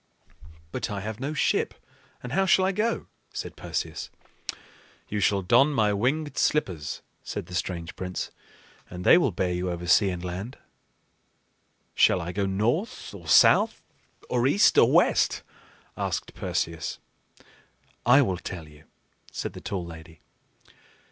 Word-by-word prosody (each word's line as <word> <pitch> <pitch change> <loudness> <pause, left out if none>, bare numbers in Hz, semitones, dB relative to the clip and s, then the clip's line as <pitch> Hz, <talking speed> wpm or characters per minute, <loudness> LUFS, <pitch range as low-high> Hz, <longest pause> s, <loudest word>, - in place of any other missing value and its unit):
"But - - -3
I 100 -2 -4
have 110 +2 -5
no 145 +4 -3
ship, - - +1 0.5
and 125 - -6
how 190 +6 +2
shall 190 0 +5
I 190 - +2
go?" 220 +4 -1 0.3
said - - -5
Perseus. - - -4 1.0
"You 105 - -2
shall 100 -1 +2
don 120 +10 +5
my 105 -5 +2
winged 140 +9 -1
slippers," 90 - 0 0.2
said - - -5
the 90 - -12
strange 85 -2 -3
prince, 90 -1 -4 0.6
"and 90 0 -7
they - - +8
will 150 - +2
bear 90 -2 -1
you 90 +1 -2
over 85 0 -4
sea 95 +4 +5
and 90 -1 -4
land." 95 +8 -5 1.4
"Shall 95 - +4
I 85 0 -4
go 100 +1 -1
north, 115 - -1
or 85 -5 -11
south, 75 - +5 0.4
or 125 0 +1
east, 195 +9 +4
or - - +6
west?" - - +3 0.5
asked - - -3
Perseus. 80 -1 -3 1.1
"I 135 +4 +6
will 95 -7 -1
tell 85 -5 -7
you," 75 +1 -17 0.5
said - - -4
the - - -9
tall 95 -3 -4
lady. 80 -1 -11
100 Hz, 145 wpm, -26 LUFS, 90-125 Hz, 1.4 s, they